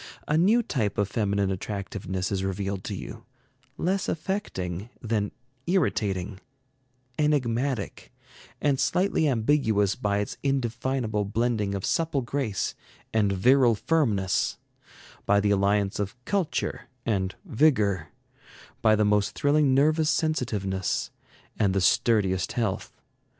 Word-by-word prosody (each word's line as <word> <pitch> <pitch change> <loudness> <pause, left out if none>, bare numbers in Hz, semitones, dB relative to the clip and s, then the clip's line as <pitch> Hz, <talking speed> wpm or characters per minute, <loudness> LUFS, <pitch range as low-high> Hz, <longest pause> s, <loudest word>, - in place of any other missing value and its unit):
A 150 - +1
new 210 +9 +4
type 110 - -1
of 105 - +2
feminine 100 -2 0
attractiveness 95 -1 -4
is 95 -1 -1
revealed 95 0 -3
to 100 - -3
you, - - -8 0.5
less 190 +3 0
affecting 110 - -3
than 110 -3 -1 0.4
irritating, 105 - 0 0.8
enigmatic 130 -5 0 0.5
and 140 -2 +1
slightly 180 -4 +2
ambiguous 110 -6 +2
by 100 -1 0
its 105 0 -3
indefinable 120 -4 -1
blending 110 -1 0
of 95 - -3
supple 165 -4 0
grace 120 -6 -2 0.4
and 105 -3 +2
virile 120 +5 +4
firmness, 105 - +1 0.7
by 100 0 +5
the 100 0 +2
alliance 100 0 +1
of 100 +1 -2
culture 195 -5 -2 0.2
and 95 -4 -1
vigor, 110 - +2 0.7
by 110 -1 +5
the 105 0 +2
most 105 -1 +2
thrilling 145 -2 +3
nervous 155 +3 +3
sensitiveness 105 - -1 0.5
and 100 -3 +2
the - - +3
sturdiest 95 -2 +2
health. 110 -4 -2
110 Hz, 115 wpm, -26 LUFS, 100-140 Hz, 0.8 s, by